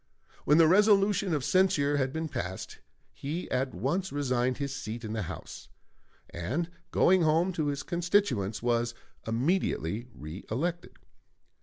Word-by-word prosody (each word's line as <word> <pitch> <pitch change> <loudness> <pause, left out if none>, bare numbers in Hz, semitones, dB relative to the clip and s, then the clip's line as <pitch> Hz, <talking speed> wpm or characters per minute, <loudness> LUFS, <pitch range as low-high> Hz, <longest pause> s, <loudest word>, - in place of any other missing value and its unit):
When 150 - +5
the 165 -1 +7
resolution 200 +1 +4
of 150 -4 0
censure 150 -5 +3
had 130 -1 0
been 160 +2 -3
passed, 95 - -5 0.3
he 160 +6 -4
at 130 -3 -1
once 165 - -1
resigned 130 -3 0
his 140 -2 -3
seat 115 0 -6
in 110 - -4
the 110 - -2
House, 90 - -8 0.6
and 135 - -3 0.2
going 185 0 +4
home 165 +4 +2
to 155 -3 -1
his 140 -1 -2
constituents, 170 - 0
was 120 -1 +1 0.3
immediately 115 - 0
reëlected. 115 - -4
145 Hz, 135 wpm, -29 LUFS, 120-175 Hz, 0.6 s, the